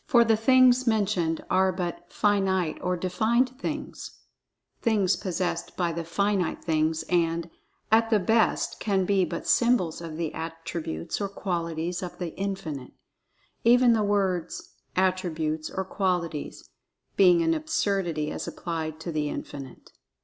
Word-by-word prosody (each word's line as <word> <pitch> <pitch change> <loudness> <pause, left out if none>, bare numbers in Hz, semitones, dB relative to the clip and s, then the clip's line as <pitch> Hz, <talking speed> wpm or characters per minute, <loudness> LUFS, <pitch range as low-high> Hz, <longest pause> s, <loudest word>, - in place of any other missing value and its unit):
For 240 -5 +6
the 225 -1 +3
"things" 255 +2 +5
mentioned 195 -7 +1
are 190 0 +3
but 180 -2 -5
"finite" 190 -5 +1
or 180 0 -1
"defined" 230 +9 +1
things—things 210 -7 -3
possessed 180 -1 -3
by 175 -2 +1
the 165 +1 -4
Finite 195 +2 0
Things—and, 165 +1 0 0.4
at 225 +1 +4
the 220 - +4
best 220 +3 +1
can 195 -3 +1
be 195 -1 +2
but 170 0 -5
symbols 235 -10 +2
of 165 -2 -7
the 165 -2 -3
attributes 165 - -5
or 200 - -1
qualities 170 -2 -3
of 180 -2 -6
The 175 -3 -5
Infinite; 190 -9 -4 0.7
even 245 +1 +6
the 220 - +2
words 195 -4 -1 0.2
"attributes" 165 -4 0
or 190 - -3
"qualities" 180 -6 -2 0.5
being 355 -3 +5
an 330 0 +2
absurdity 195 - -1
as - - -5
applied 160 -2 -4
to 170 - -4
The 150 -2 -1
Infinite. 135 -3 -8
185 Hz, 130 wpm, -26 LUFS, 165-210 Hz, 0.7 s, For